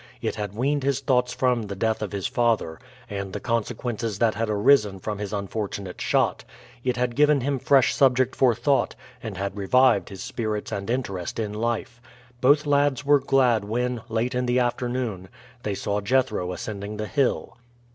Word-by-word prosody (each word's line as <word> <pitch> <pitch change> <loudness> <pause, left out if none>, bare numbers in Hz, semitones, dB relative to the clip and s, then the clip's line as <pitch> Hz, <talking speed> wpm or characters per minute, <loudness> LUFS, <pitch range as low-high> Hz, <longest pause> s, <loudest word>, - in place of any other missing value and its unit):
It - - -2
had 105 -1 -5
weaned 140 +5 0
his 135 0 0
thoughts 125 -2 +1
from 125 -2 +1
the 100 - -5
death 110 +2 0
of 105 -4 -3
his 100 -2 -4
father, 115 -9 0 0.3
and 100 -3 -5
the 105 - -3
consequences 115 -1 -2
that 115 0 +2
had 110 +1 -2
arisen 105 -1 +3
from 105 +2 -5
his 105 -2 -4
unfortunate 100 -2 -4
shot; - - +1 0.4
it 125 -1 0
had 125 -1 -1
given 150 -1 +4
him 135 +1 -1
fresh 135 0 +4
subject 130 -1 +3
for 125 -3 +4
thought, 135 +4 +1 0.3
and 110 -6 -6
had 100 +1 -3
revived 100 0 +3
his 95 -2 -8
spirits 110 -3 -3
and 100 0 -4
interest 100 -8 -3
in 105 -2 -2
life. 115 +1 -3 0.4
Both 145 +4 +4
lads 145 -1 +2
were 145 0 +5
glad 130 -5 +3
when, 120 +3 -2
late 115 +2 -1
in 125 0 -1
the 120 +1 +2
afternoon, 120 -6 -1 0.3
they 105 -4 -2
saw 100 +1 -2
Jethro 110 -5 +1
ascending 105 +2 -5
the 105 - -3
hill. 135 0 -1
115 Hz, 175 wpm, -25 LUFS, 105-130 Hz, 0.4 s, were